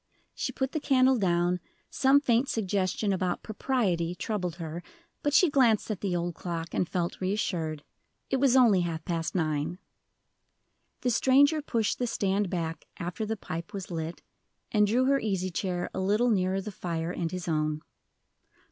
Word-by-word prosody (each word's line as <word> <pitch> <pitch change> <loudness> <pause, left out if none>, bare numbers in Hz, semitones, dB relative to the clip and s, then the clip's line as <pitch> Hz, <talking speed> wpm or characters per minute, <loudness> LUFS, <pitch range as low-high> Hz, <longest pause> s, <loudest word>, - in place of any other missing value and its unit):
She - - -3
put 265 0 -2
the 310 - -1
candle 260 -3 +4
down; 175 -1 +2 0.3
some 275 +1 +5
faint 250 -1 +2
suggestion 200 -1 0
about 185 -1 -1
"propriety" 195 -7 0
troubled 180 -4 -3
her, 165 0 -6 0.4
but 290 - +1
she 340 +5 +6
glanced 240 -7 +3
at 205 - -4
the 190 -3 -1
old 175 0 -1
clock, 165 -1 -5
and 175 - 0
felt 175 -1 -2
reassured. 170 -6 -1 0.4
It 270 - 0
was 265 -1 +4
only 230 -8 +6
half 165 -2 -3
past 165 -1 -2
nine. 155 0 -1 1.2
The 250 - +1
stranger 280 +6 +4
pushed 230 -7 -1
the 245 - 0
stand 200 -3 0
back 165 -2 -3
after 180 +5 -4
the 220 +1 -2
pipe 165 -3 -6
was 195 -2 -6
lit, 165 0 -4 0.5
and 210 -1 +4
drew 245 +5 +2
her 275 +1 +3
easy 190 -5 -1
chair 180 0 -2
a - - -3
little 210 +6 +2
nearer 190 -1 +1
the 210 - -6
fire, 170 -3 -3
and 170 -2 -2
his 180 -1 -5
own. 155 -1 0
190 Hz, 165 wpm, -28 LUFS, 170-235 Hz, 1.2 s, she